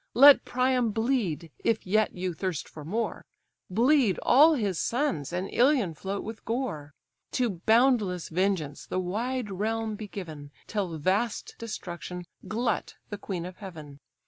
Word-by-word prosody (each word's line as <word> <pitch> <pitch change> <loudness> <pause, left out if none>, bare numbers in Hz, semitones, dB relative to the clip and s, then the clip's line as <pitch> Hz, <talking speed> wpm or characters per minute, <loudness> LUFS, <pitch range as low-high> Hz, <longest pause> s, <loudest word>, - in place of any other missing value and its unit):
Let 280 +3 +9
Priam 250 -1 +2
bleed! 210 - -1
if 225 -1 +1
yet 215 +3 +2
you 180 0 -2
thirst 180 -2 -3
for 155 - -10
more, 220 +9 -2 0.5
Bleed 235 - +3
all 305 +5 +7
his 200 - -1
sons, 245 - -1
and 180 +2 -2
Ilion 245 - +3
float 195 +5 -4
with 220 0 -7
gore: 225 - -3 0.4
To 220 -9 0
boundless 220 -7 +3
vengeance 170 -5 -1
the - - -3
wide 220 +5 -2
realm 220 +3 -1
be 210 0 -7
given, 155 -8 -8 0.2
Till 190 -7 -2
vast 195 +8 0
destruction 180 -5 -6 0.2
glut 230 0 -1 0.2
the 205 - -4
queen 180 -4 -4
of 180 0 -8
heaven! 155 -8 -10
205 Hz, 145 wpm, -28 LUFS, 180-235 Hz, 0.5 s, Let